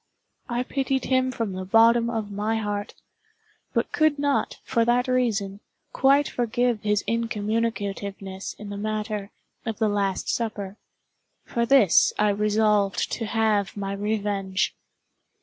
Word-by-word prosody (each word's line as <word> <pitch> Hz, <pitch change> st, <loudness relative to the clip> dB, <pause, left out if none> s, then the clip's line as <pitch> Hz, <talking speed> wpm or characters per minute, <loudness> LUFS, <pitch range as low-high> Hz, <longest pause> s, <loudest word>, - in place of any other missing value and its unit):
I 240 Hz, +1 st, 0 dB
pitied 270 Hz, -1 st, -1 dB
him 260 Hz, 0 st, +2 dB
from 230 Hz, -5 st, -3 dB
the 185 Hz, 0 st, -4 dB
bottom 230 Hz, +4 st, +4 dB
of 220 Hz, -3 st, -3 dB
my 210 Hz, +2 st, -1 dB
heart—but 205 Hz, -1 st, -6 dB
could 310 Hz, -2 st, +2 dB
not, 285 Hz, -1 st, 0 dB
for 235 Hz, -3 st, +1 dB
that 245 Hz, +2 st, +2 dB
reason, 220 Hz, -6 st, 0 dB, 0.3 s
quite 275 Hz, +2 st, +4 dB
forgive 240 Hz, -1 st, 0 dB
his 210 Hz, -1 st, +1 dB
incommunicativeness 205 Hz, -3 st, -2 dB
in 205 Hz, -1 st, -8 dB
the 200 Hz, -, -5 dB
matter 210 Hz, -1 st, -3 dB, 0.3 s
of 225 Hz, -3 st, -4 dB
the 220 Hz, -1 st, +1 dB
"Last 200 Hz, -2 st, -1 dB
Supper." 210 Hz, -3 st, -3 dB, 0.7 s
For 235 Hz, 0 st, -1 dB
this 235 Hz, -9 st, +5 dB
I 210 Hz, 0 st, +3 dB
resolved 210 Hz, -1 st, +1 dB
to 225 Hz, -, -3 dB
have 210 Hz, -2 st, +1 dB
my 195 Hz, -1 st, -3 dB
revenge. 200 Hz, -2 st, -1 dB
215 Hz, 130 wpm, -25 LUFS, 205-235 Hz, 0.7 s, this